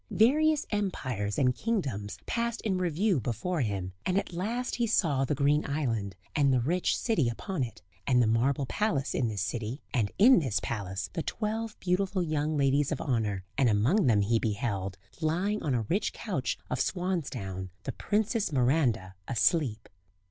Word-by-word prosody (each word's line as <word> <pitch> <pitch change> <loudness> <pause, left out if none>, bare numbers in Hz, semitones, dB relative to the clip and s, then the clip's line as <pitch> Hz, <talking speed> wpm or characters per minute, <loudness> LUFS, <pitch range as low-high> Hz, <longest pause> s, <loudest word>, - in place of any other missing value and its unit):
Various 300 +7 +3
empires 130 - -2
and 125 -2 +3
kingdoms 135 - -2
passed 235 0 -1
in 190 -4 0
review 180 +1 +1
before 125 - -2
him; 95 -5 -2
and 185 - +1
at 195 - -2
last 230 +8 -2
he 240 -1 +1
saw 150 - +2
the 145 - 0
green 145 +2 +3
island, 115 -10 -1 0.2
and 140 -3 +4
the 130 - +3
rich 170 +9 +1
city 185 - +1
upon 180 - -4
it; 120 -7 -4 0.2
and 125 -3 +4
the 120 - +5
marble 125 +5 +2
palace 150 - 0
in 120 - +1
this 105 -4 -2
city, 115 - -4
and 110 -6 +1
in 240 +2 +7
this 130 -10 0
palace 95 -4 -4
the 165 - -1
twelve 220 +3 -3
beautiful 185 +1 0
young 155 -1 0
ladies 140 +1 +2
of 150 - -1
honour, 105 -7 -1 0.2
and 130 -3 +5
among 125 - +3
them 105 -4 +4
he 115 +3 +2
beheld, 100 -4 -2 0.2
lying 185 +7 0
on 140 -5 0
a 115 - 0
rich 195 - 0
couch - - -2
of - - -2
swansdown, 135 - -2
the - - -3
Princess 215 -1 0
Miranda 125 - +2
asleep. 125 -3 +1
140 Hz, 170 wpm, -29 LUFS, 115-190 Hz, 0.2 s, in